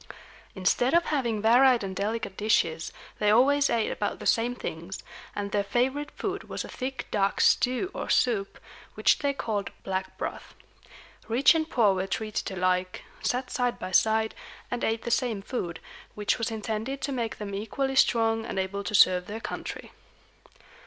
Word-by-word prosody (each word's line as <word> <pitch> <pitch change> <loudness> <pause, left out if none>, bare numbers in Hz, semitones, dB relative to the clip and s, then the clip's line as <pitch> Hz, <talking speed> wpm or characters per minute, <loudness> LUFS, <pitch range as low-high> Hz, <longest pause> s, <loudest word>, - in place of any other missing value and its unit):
Instead 245 - +2
of 340 - +4
having 235 -8 -1
varied 245 +1 +5
and 190 -1 -4
delicate 205 0 -2
dishes, 165 -7 +1 0.3
they 210 - +3
always 280 +6 +4
ate 230 -2 +1
about 205 - -2
the - - -9
same 235 +2 +2
things; 170 -3 -6 0.3
and 200 -1 -3
their 205 0 +1
favorite 260 +8 0
food 400 0 -5
was - - -4
a - - -8
thick 260 0 -5
dark 200 -1 +1
stew 255 +9 +3
or - - -5
soup, 215 -6 +1 0.4
which - - +3
they 285 -1 +1
called 215 -7 -3
black 190 0 -3
broth. - - -6 0.7
Rich 245 +7 +5
and 320 -1 -1
poor 215 -5 +4
were 190 0 -2
treated 215 +2 -3
alike, 185 -1 -1 0.2
sat 250 +1 -1
side 245 -1 0
by 185 - -6
side, 220 +3 +3 0.4
and 245 - -2
ate 225 0 0
the 235 - -3
same 230 -6 0
food, 175 -8 -4 0.4
which 210 -1 0
was 230 - -1
intended 220 +4 -3
to 280 - -2
make 235 -4 -2
them 205 -2 -6
equally 265 +7 -2
strong 225 -3 +3
and 210 - -5
able 190 +1 -2
to 200 +2 -2
serve 180 -2 +5
their 215 +2 -5
country. - - -6
220 Hz, 170 wpm, -27 LUFS, 200-250 Hz, 0.7 s, varied